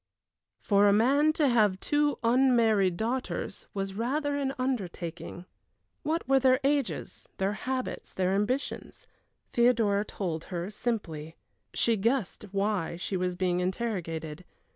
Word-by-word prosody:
For 200 0 +4
a 200 - +5
man 275 +8 +4
to 305 -2 +2
have 210 -6 +3
two 290 +3 +1
unmarried 230 -7 +3
daughters 230 -2 -3
was 195 -1 -2
rather 285 +7 -1
an 275 -2 0
undertaking. 180 -9 -4 0.6
What 320 0 -1
were 270 0 +5
their 260 0 +4
ages 280 -2 -1
their 195 +1 0
habits 255 +4 -4
their 185 0 0
ambitions? 245 +8 -2 0.5
Theodora 230 -4 +3
told 170 -6 -4
her 180 +1 -4
simply. 170 -9 -3 0.4
She 230 -1 +3
guessed 230 0 0
why 200 -4 0
she 185 +3 -3
was 180 -1 -1
being 180 -1 0
interrogated. 180 -5 -3
215 Hz, 125 wpm, -29 LUFS, 185-255 Hz, 0.6 s, a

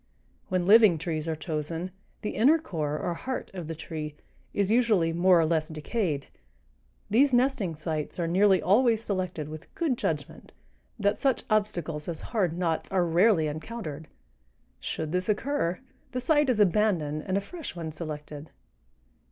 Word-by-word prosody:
When 185 -1 0
living 210 -3 +7
trees 155 0 -3
are 160 - -1
chosen, 160 +2 -4 0.3
the 210 - -1
inner 280 +9 +5
core, 155 - -3
or 175 - -2
heart 255 +9 -5
of 175 -4 -6
the 165 - -4
tree, 155 -1 -6 0.4
is 200 0 0
usually 215 -9 +3
more 175 +1 +5
or 165 - +3
less 155 -1 +1
decayed. 155 - -2 0.9
These 260 +4 +5
nesting 245 -9 +1
sites 155 +1 -4
are 170 - +1
nearly 190 +2 +4
always 225 +3 +3
selected 185 -7 -2
with 155 +2 -8
such - - -35
good 325 -10 0
judgment 150 -4 -4 0.4
that 205 0 +1
such 270 -3 +1
obstacles 175 -8 0
as 170 -3 -4
hard 180 -7 +1
knots 165 -3 -1
are 185 -2 +2
rarely 170 0 +4
encountered; 155 -1 -5 0.7
should 155 -1 -4
this 180 +3 -1
occur, 210 -5 0 0.3
the 255 - -1
site 295 +2 +3
is 240 -4 +2
abandoned 175 -7 +2
and 190 +1 +1
a - - +3
fresh 325 - -8
one 165 -2 -5
selected." 150 -1 -7
175 Hz, 160 wpm, -28 LUFS, 155-215 Hz, 0.9 s, living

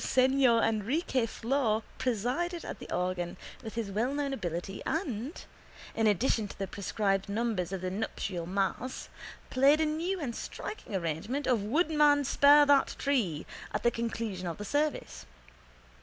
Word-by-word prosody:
Senhor 260 -3 +4
Enrique 230 - +1
Flor 230 -2 0 0.2
presided 260 - -1
at - - -6
the - - -10
organ 180 -1 -2 0.2
with 225 -3 -8
his 225 -4 -3
wellknown 275 +7 0
ability 175 -4 -4
and, 285 - -3 0.5
in 225 -1 +2
addition 215 +1 +2
to - - -11
the 195 - -2
prescribed 195 0 -1
numbers 205 -4 -1
of 190 -2 -3
the 185 0 -2
nuptial 190 -4 -3
mass, 200 +7 -2 0.4
played 275 +4 +5
a 315 - +3
new 335 +5 -1
and 250 -7 -3
striking 320 - -6
arrangement 185 - -2
of 245 -5 +2
Woodman, 295 - +3
spare 290 +2 +6
that 285 -1 +4
tree 220 - 0 0.3
at - - -1
the 235 - +4
conclusion 225 -5 -3
of 170 - -4
the 205 - -6
service. 290 - -1
230 Hz, 145 wpm, -30 LUFS, 195-280 Hz, 0.5 s, spare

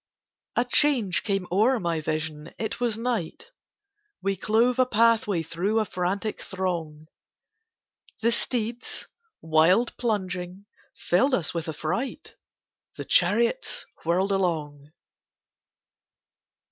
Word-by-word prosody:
A 240 - +2
change 245 -8 +3
came 195 -3 -1
o'er 225 +7 +3
my 170 -4 -1
Vision—it 155 +7 -4
was 235 -3 0
night: 240 - -3 0.7
We 195 0 +1
clove 235 +5 +2
a 255 - +6
pathway 225 -6 +3
through 195 +8 0
a 215 - +1
frantic 195 +4 -2
throng: 170 -5 -4 1.2
The 235 - +4
steeds, 235 0 -2 0.3
wild 165 +9 +3
plunging, 185 -4 -3 0.3
filled 255 +10 +2
us 165 -8 -1
with 165 -1 -3
affright: 210 - -3 0.6
The - - -5
chariots 230 - +2 0.2
whirled 185 +4 +1
along. 155 -6 -1
195 Hz, 100 wpm, -26 LUFS, 170-230 Hz, 1.2 s, a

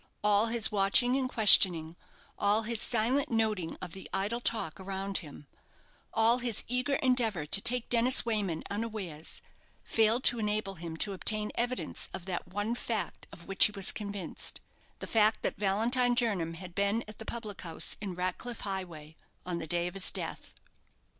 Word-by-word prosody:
All 210 +1 +3
his 230 -1 +3
watching 210 +5 +2
and 265 -1 -1
questioning 175 -8 +7 0.4
all 205 +2 +1
his 230 0 -2
silent 245 +4 0
noting 215 -7 -1
of 180 - -7
the 190 +2 -10
idle 205 +5 -2
talk 215 -9 -2
around 195 +1 -4
him 150 -3 -12 0.7
all 230 +2 +2
his 240 -4 -2
eager 250 +3 -1
endeavour 230 - 0
to 195 +6 +4
take 240 +2 +5
Dennis 245 +2 +5
Wayman 205 -8 -2
unawares, 200 -7 -6 0.4
failed 225 +3 +1
to 240 - +4
enable 210 -2 -2
him 165 -2 -8
to 200 +4 0
obtain 210 +2 +1
evidence 245 +1 -4
of 175 - -9
that 185 -2 -5
one 205 +5 -3
fact 230 -2 -4
of 170 - -13
which 195 - +3
he - - 0
was 200 0 -1
convinced 200 -4 -5 0.4
the - - -8
fact 215 -1 +1
that - - -2
Valentine 235 +5 +1
Jernam 195 -9 -1
had 180 0 -10
been 200 +4 -1
at 215 - -12
the - - -7
public 215 -4 -7
house 165 -2 0
in 195 -4 -5
Ratcliff 185 +7 -5
Highway 175 -6 -6 0.3
on 175 -1 -4
the 160 - -7
day 175 +2 0
of 175 - -5
his 195 -1 +5
death. - - -6
210 Hz, 170 wpm, -29 LUFS, 185-230 Hz, 0.7 s, questioning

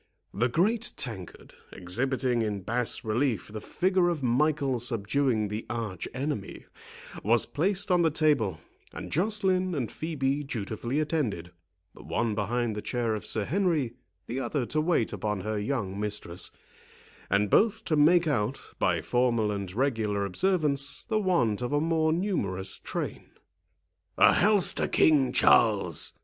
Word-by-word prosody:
The 120 +6 +1
great 215 - +1
tankard, 95 -8 -7 0.2
exhibiting 125 +6 -1
in 105 -3 -2
bas 120 +4 -1
relief 110 -2 0
the 110 0 -7
figure 185 - +1
of 160 -5 -3
Michael 135 +1 +1
subduing 115 0 0
the 105 +2 -4
Arch 110 -6 -4
enemy, 130 -5 -4 0.6
was 115 +3 +3
placed 190 +5 0
on 180 -1 +4
the 165 - +4
table, 145 - +1 0.4
and - - -7
Joceline 185 -1 +1
and 125 -6 -2
Phœbe 145 -3 -2
dutifully 120 +4 -3
attended; 130 - -2 0.4
the - - -14
one 115 -2 -1
behind 110 +2 -1
the 105 - -4
chair 120 -2 -1
of 105 -4 -4
Sir 110 -2 -1
Henry, 160 - 0 0.3
the 125 +3 -4
other 135 -1 -1
to 155 +5 0
wait 155 -8 +1
upon 105 -2 -2
her 110 +1 -2
young 105 -4 -2
mistress, 105 -4 -3 0.8
and 100 +1 +1
both 225 +1 +3
to 155 - +1
make 165 +4 +5
out, 135 -4 0 0.2
by - - +1
formal 120 -4 +1
and 100 -3 -4
regular 110 -4 0
observance, 145 - 0
the 220 -2 0
want 130 - +1
of 125 - -2
a 145 - +3
more 160 0 +1
numerous 100 - -2
train. - - -5 0.9
"A - - +7
health 205 -1 +3
to - - -1
King 145 -5 +4
Charles!" 100 -8 +3
125 Hz, 145 wpm, -28 LUFS, 105-155 Hz, 0.9 s, A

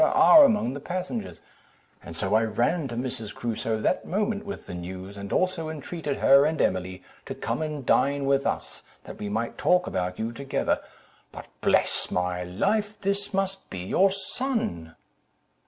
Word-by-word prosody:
are 315 -1 +8
among 210 - +1
the 140 - -5
passengers;' 185 - -5 0.7
so 95 +5 -2
I 110 - +5
ran 120 +8 0
to 120 - -6
Mrs. 120 -4 -4
Crusoe 115 -1 -2
that 185 - +1
moment 205 +2 -2
with 200 - -6
the - - -8
news, 95 +3 -7
and 100 0 -7
also 180 -4 0
entreated 155 -1 -4
her 140 +1 +6
and 155 +1 0
Emily 90 0 -1 0.2
to - - -5
come - - -3
and 150 -4 -4
dine 140 +2 +2
with 140 0 +2
us, - - -4 0.2
that - - -10
we 105 - -4
might 115 +3 -3
talk 180 0 +3
about 90 0 -2
you 110 +1 -2
together: 135 +3 -1 0.5
but, - - -9 0.2
bless - - +2
my 90 0 -1
life, 205 - -1
this 200 +1 -1
must 195 -1 -2
be 95 -2 -6
your 190 - +3
son!" 195 - -3
140 Hz, 165 wpm, -26 LUFS, -, 0.7 s, are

